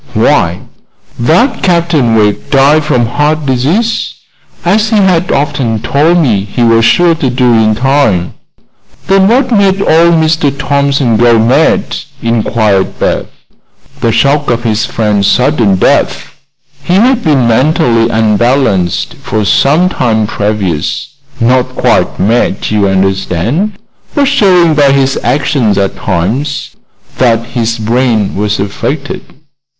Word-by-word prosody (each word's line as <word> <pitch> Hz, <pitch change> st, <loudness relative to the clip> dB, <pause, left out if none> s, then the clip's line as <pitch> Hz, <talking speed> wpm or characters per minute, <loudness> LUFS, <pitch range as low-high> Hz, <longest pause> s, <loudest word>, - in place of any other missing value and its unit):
Why, -, -, +1 dB, 0.6 s
that 165 Hz, -, +1 dB
Captain 170 Hz, -10 st, +1 dB
Wegg 105 Hz, -2 st, 0 dB
died 145 Hz, +3 st, +3 dB
from 125 Hz, -5 st, 0 dB
heart 150 Hz, +5 st, -1 dB
disease, 160 Hz, -, -1 dB, 0.5 s
as 210 Hz, +5 st, +1 dB
he 220 Hz, -, 0 dB
had 185 Hz, -4 st, +1 dB
often 140 Hz, -5 st, -1 dB
told 155 Hz, +9 st, +1 dB
me 115 Hz, -, +1 dB
he 105 Hz, +4 st, -3 dB
was 115 Hz, -1 st, +3 dB
sure 175 Hz, +7 st, +3 dB
to 150 Hz, -5 st, -2 dB
do 125 Hz, -1 st, +1 dB
in 110 Hz, -1 st, +2 dB
time." 115 Hz, -8 st, 0 dB, 0.7 s
"Then 195 Hz, 0 st, +3 dB
what 250 Hz, +4 st, +1 dB
made 200 Hz, -3 st, +2 dB
old 170 Hz, -2 st, +3 dB
Mr. 160 Hz, -2 st, +1 dB
Thompson 140 Hz, -4 st, 0 dB
go 120 Hz, 0 st, +3 dB
mad?" 125 Hz, +8 st, +1 dB, 0.2 s
inquired 110 Hz, -4 st, -1 dB
Beth. -, -, -2 dB, 0.7 s
"The 115 Hz, -, 0 dB
shock 145 Hz, +5 st, +1 dB
of 120 Hz, 0 st, -1 dB
his 110 Hz, +1 st, -1 dB
friend's 105 Hz, -4 st, -1 dB
sudden 125 Hz, -7 st, +1 dB
death. 95 Hz, -, 0 dB, 0.5 s
He 175 Hz, +6 st, -1 dB
had 245 Hz, +4 st, +2 dB
been 140 Hz, -7 st, +1 dB
mentally 120 Hz, -2 st, +1 dB
unbalanced 110 Hz, -4 st, 0 dB
for 105 Hz, 0 st, -2 dB
some 150 Hz, -, +2 dB
time 110 Hz, -, -1 dB
previous 100 Hz, -7 st, -3 dB, 0.3 s
not 125 Hz, +2 st, +1 dB
quite -, -, 0 dB
mad, 115 Hz, +4 st, 0 dB
you 105 Hz, -2 st, +1 dB
understand, 95 Hz, -, -1 dB, 0.4 s
but 285 Hz, -2 st, +2 dB
showing 185 Hz, -, +3 dB
by 145 Hz, -2 st, +3 dB
his 135 Hz, -1 st, 0 dB
actions 135 Hz, -8 st, 0 dB
at 100 Hz, -1 st, -1 dB
times 110 Hz, -, -3 dB, 0.5 s
that 115 Hz, -2 st, +1 dB
his 115 Hz, -1 st, -3 dB
brain 115 Hz, -2 st, -1 dB
was 105 Hz, +1 st, -2 dB
affected." 135 Hz, +8 st, -4 dB
125 Hz, 130 wpm, -10 LUFS, 110-155 Hz, 0.7 s, died